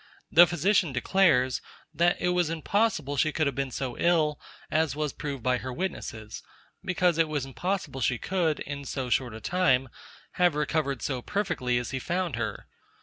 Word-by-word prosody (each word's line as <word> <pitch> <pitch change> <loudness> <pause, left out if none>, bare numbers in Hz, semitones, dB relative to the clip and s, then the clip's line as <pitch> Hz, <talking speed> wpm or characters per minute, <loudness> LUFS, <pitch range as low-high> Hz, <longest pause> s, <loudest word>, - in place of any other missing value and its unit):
The 175 +2 +8
physician 175 -1 +2
declares, 130 -2 +2 0.3
that 175 +1 +2
it 180 - +1
was 180 -2 +1
impossible 165 -3 0
she 155 +3 +2
could 155 +1 0
have 140 -3 -1
been 135 -1 -1
so 130 -1 -4
ill 160 -4 +2 0.3
as 155 -3 +1
was 150 -1 -2
proved 140 -5 -5
by 125 -1 +2
witnesses; 125 - -5 0.4
because 180 -2 +1
it 165 - +4
was 150 -3 -2
impossible 150 -1 -3
she 120 0 +1
could, 170 0 0
in 140 0 -5
so 130 -2 -4
short 120 -3 +1
a - - -7
time, 135 -6 +2 0.5
have 175 -4 +4
recovered 150 -3 -1
so 130 -3 -2
perfectly 125 -9 -1
as 120 - -3
he 130 - -2
found 175 0 -2
her. 110 -3 -4
150 Hz, 170 wpm, -27 LUFS, 130-175 Hz, 0.5 s, The